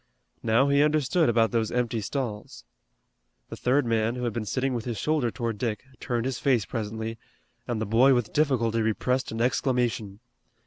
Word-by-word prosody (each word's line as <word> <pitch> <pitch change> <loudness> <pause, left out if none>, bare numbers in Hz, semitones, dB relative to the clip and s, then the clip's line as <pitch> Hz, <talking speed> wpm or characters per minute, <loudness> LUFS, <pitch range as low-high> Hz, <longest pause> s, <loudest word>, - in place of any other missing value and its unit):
Now 115 +4 +3
he 140 0 +4
understood 150 +1 +2
about 115 -1 +3
those 115 -2 0
empty 120 -2 -1
stalls. 110 -2 -5 0.9
The - - -6
third 130 +2 +1
man, 115 0 +1
who 125 - -4
had 120 -3 -1
been 115 -2 -3
sitting 130 +4 -1
with 120 -2 -3
his 120 -3 -3
shoulder 150 +1 0
toward 115 -3 -4
Dick, 110 -4 -2 0.2
turned 120 -1 -2
his 130 -2 -2
face 125 -8 +2
presently, 110 0 -4 0.5
and 120 -2 -2
the 110 - -1
boy 125 +6 +5
with 120 -3 -1
difficulty 120 -7 +1
repressed 125 +4 0
an 115 +1 -3
exclamation. 120 -5 0
120 Hz, 175 wpm, -26 LUFS, 110-130 Hz, 0.9 s, boy